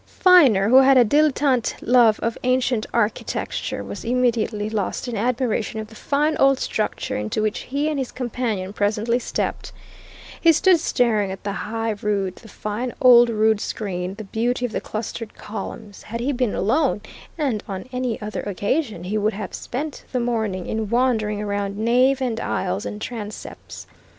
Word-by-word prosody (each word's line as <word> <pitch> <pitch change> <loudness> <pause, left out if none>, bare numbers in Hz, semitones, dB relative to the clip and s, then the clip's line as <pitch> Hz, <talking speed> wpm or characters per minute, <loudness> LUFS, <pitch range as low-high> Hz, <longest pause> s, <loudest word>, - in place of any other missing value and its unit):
Viner, 270 - +6
who 255 - +7
had 270 0 +7
a 245 - +7
dilettante 280 -1 +2
love 235 -3 +4
of 230 0 -1
ancient 255 -3 +1
architecture, 230 -2 -2
was - - -7
immediately 235 -3 0
lost 215 +3 -2
in 240 - -3
admiration 230 -1 -1
of 215 -1 -6
the 220 - -14
fine 295 +6 0
old 275 0 +4
structure 215 -4 -2
into 105 - -2
which 215 -1 0
he 285 +3 -2
and 305 -2 -1
his 260 - -3
companion 225 -6 -3
presently 215 +4 0
stepped. - - -3 0.7
He 330 -1 +6
stood 355 +2 +4
staring 220 - +1
at 190 - -8
the 200 - -2
high 225 +2 -3
rood, 200 -3 -1
the 225 - -14
fine 220 +4 -4
old 240 -2 +7
rood 220 -1 +2
screen, 185 -3 -4
the 215 - -7
beauty 240 +4 -1
of 240 - -4
the - - -3
clustered 220 0 -6
columns 210 0 -8
had 230 +2 -6
he 255 +4 0
been 250 -4 0
alone, 245 - +1 0.4
and 265 -9 -1
on 195 +3 -6
any 250 -2 -2
other 210 +1 -4
occasion, 205 - -2
he 205 +4 -1
would 215 +1 +1
have 200 -1 -6
spent 285 +4 -5
the 255 - 0
morning 220 -6 -1
in 220 -2 -3
wandering 230 -4 +1
around 200 -1 -2
nave 250 +4 +3
and 230 -3 -1
aisles 190 -1 -2
and 210 - -6
transepts. 215 -3 -7
225 Hz, 170 wpm, -22 LUFS, 210-255 Hz, 0.7 s, who